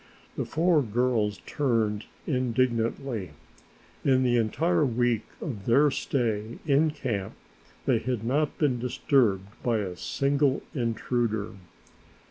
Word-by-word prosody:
The - - -2
four 165 -1 +3
girls 110 -3 0
turned 115 -7 0 0.2
indignantly. 120 - -1 0.7
In 130 -1 +3
the 120 -1 +3
entire 150 +10 +2
week 120 -3 +1
of 110 -11 -6
their 140 +5 +5
stay 115 -5 -1
in 150 +2 +4
camp 115 -10 -3 0.5
they 125 -4 +3
had 125 -2 -2
not 145 +5 0
been 135 -6 +1
disturbed 115 -5 +1
by 120 -2 +1
a 95 -4 -3
single 140 - +1
intruder. 115 -4 -1
120 Hz, 110 wpm, -27 LUFS, 110-140 Hz, 0.7 s, their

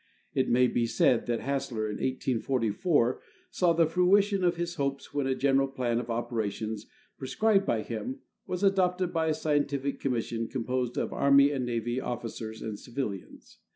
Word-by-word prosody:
It 130 -1 +1
may 125 +1 +5
be 120 -1 +1
said 120 +1 +2
that 120 -1 -1
Hassler, 135 -4 -2
in 105 -1 -3
1844, 130 - 0 0.3
saw 180 -2 +2
the 165 0 +4
fruition 190 +4 +3
of 175 -1 +3
his 170 0 -3
hopes 140 -3 -3
when 145 -2 0
a 130 - +1
general 135 0 +2
plan 125 -3 -1
of 120 -1 -6
operations 110 -2 -3 0.3
prescribed 195 +9 +2
by 110 -2 +1
him 250 - -4 0.3
was 180 +2 -3
adopted 185 -2 +2
by 160 -1 +1
a 155 - +1
scientific 140 -2 -1
commission 115 -3 -2
composed 125 -1 -2
of - - -1
Army 140 0 +5
and 130 -4 -2
Navy 120 +1 -1
officers 110 -2 -5
and 105 -2 -5
civilians. 115 -7 -6
130 Hz, 160 wpm, -29 LUFS, 115-160 Hz, 0.3 s, may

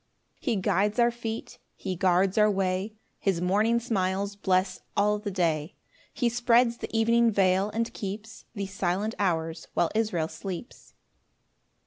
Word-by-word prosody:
3 250 - 0
He - - 0
guides 200 +2 +1
our 240 0 +4
feet, 230 -1 -6 0.2
he 190 -2 -4
guards 185 +1 +2
our 215 -1 +5
way; 195 +1 -1 0.2
His 190 -4 0
morning 210 +6 +2
smiles 200 -3 -1
bless 185 -1 0 0.2
all 210 +1 +3
the 205 0 -4
day; 165 -5 -1 0.4
He 245 - 0
spreads 240 0 +3
the - - -6
evening 230 +1 +3
veil, 195 -1 +2
and 230 +2 -2
keeps 210 +1 -7
The 200 -1 -2
silent 195 +2 -1
hours 165 -4 -1
while 170 - +2
Israel 210 -8 0
sleeps. 190 - -8
200 Hz, 145 wpm, -27 LUFS, 185-225 Hz, 0.4 s, our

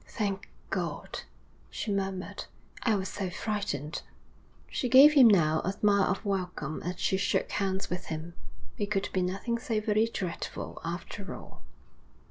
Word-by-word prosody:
'Thank 200 -3 -2 0.2
God,' - - -3 0.5
she 215 - -3
murmured. 195 -1 -2 0.4
'I 225 -3 +3
was 190 -1 -1
so 190 -1 -3
frightened.' 190 - -3 0.7
She 250 - -2
gave 275 +4 +9
him, 270 -5 +9
now, 160 -7 +4
a 190 - 0
smile 200 -1 +3
of 195 +3 -1
welcome 180 -6 -2
as 180 +1 -4
she 190 - +2
shook 195 - +1
hands 195 -2 -1
with 180 +1 -3
him. 160 +2 -5 0.5
It 205 - 0
could 200 -2 0
be 185 - +2
nothing 195 +6 -1
so 225 -1 0
very 215 +1 +2
dreadful 180 -6 -4
after 175 +4 -5
all. - - -12
195 Hz, 150 wpm, -30 LUFS, 180-210 Hz, 0.7 s, gave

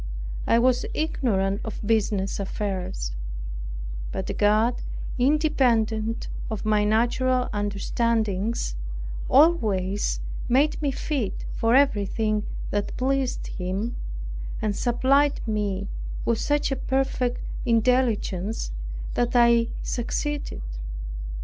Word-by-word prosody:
I 230 - +5
was 245 +1 +3
ignorant 200 -11 0
of 220 - -5
business 205 -3 +1
affairs; 190 - -3 1.0
but - - -3
God, 215 +4 +3 0.4
independent 240 -6 +2 0.2
of 215 -2 -4
my 210 -1 +3
natural 245 +4 +2
understandings, 205 - 0 0.6
always 210 - +3 0.3
made 280 +6 +3
me 290 - +1
fit 270 -5 -2
for 230 +2 +2
everything 215 -4 +2 0.2
that 205 0 -1
pleased 265 0 0
Him, 195 +6 -3 0.6
and 210 -2 0
supplied 275 +5 +3
me 200 -2 -1 0.4
with 230 -1 +2
such 290 -1 +1
a - - +2
perfect 265 -2 0 0.3
intelligence 225 - +1 0.4
that 240 +1 0
I 235 -1 +6 0.2
succeeded. 280 - -2
225 Hz, 90 wpm, -25 LUFS, 205-255 Hz, 1.0 s, I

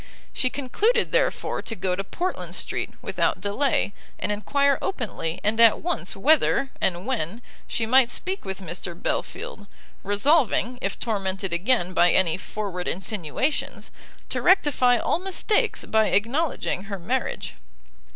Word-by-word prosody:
She 255 - +1
concluded, 415 - +1
therefore, - - 0
to 225 - -4
go 180 -1 -1
to 195 - -3
Portland 360 - -3
street - - -2
without - - 0
delay, 205 0 0 0.2
and - - -1
enquire 280 +7 +1
openly 200 - -3
and 215 +2 +1
at 230 -2 +7
once 335 - -2
whether, 275 +3 +3
and 180 +1 0
when, 230 -3 -2 0.2
she 225 - -1
might 250 +1 +5
speak 375 +9 -2
with 190 0 -5
Mr 175 0 -5
Belfield; 205 - -4 0.4
resolving, 245 +3 +2
if 195 - -3
tormented 195 -4 -2
again 185 0 +1
by 175 -1 +5
any 170 -4 +3
forward 190 -2 -5
insinuations, 200 - -2 0.4
to - - -2
rectify 290 -9 +4
all 275 - 0
mistakes 385 +3 0
by 220 -1 +3
acknowledging 235 - 0
her 200 -2 -5
marriage. 245 +9 -3
220 Hz, 135 wpm, -24 LUFS, 190-280 Hz, 0.4 s, at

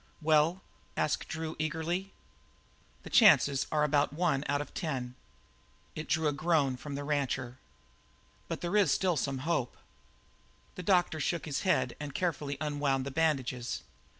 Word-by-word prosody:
"Well?" 160 +3 +3 0.3
asked 150 - 0
Drew 160 0 -4
eagerly. 165 +5 -2 0.9
"The - - -10
chances 140 - +6
are 150 -1 +2
about 145 -1 +2
one 150 -3 0
out 145 0 +2
of 145 - -6
ten." 130 -8 -3 0.8
It 155 - -6
drew 155 +1 +2
a 145 - +1
groan 145 -3 +1
from 140 +3 -7
the 145 - -4
rancher. 130 -4 -2 0.9
"But - - -4
there 175 +3 -2
is 200 -8 +4
still 180 +1 +2
some 140 -1 -1
hope." 150 -7 -1 1.0
The - - -7
doctor 180 -3 +2
shook 170 +3 -1
his 145 -3 -2
head 130 -10 +1
and 145 -2 -6
carefully 150 -5 -2
unwound 145 -3 0
the 140 - -4
bandages. 130 -6 -1
150 Hz, 150 wpm, -31 LUFS, 140-165 Hz, 1.0 s, chances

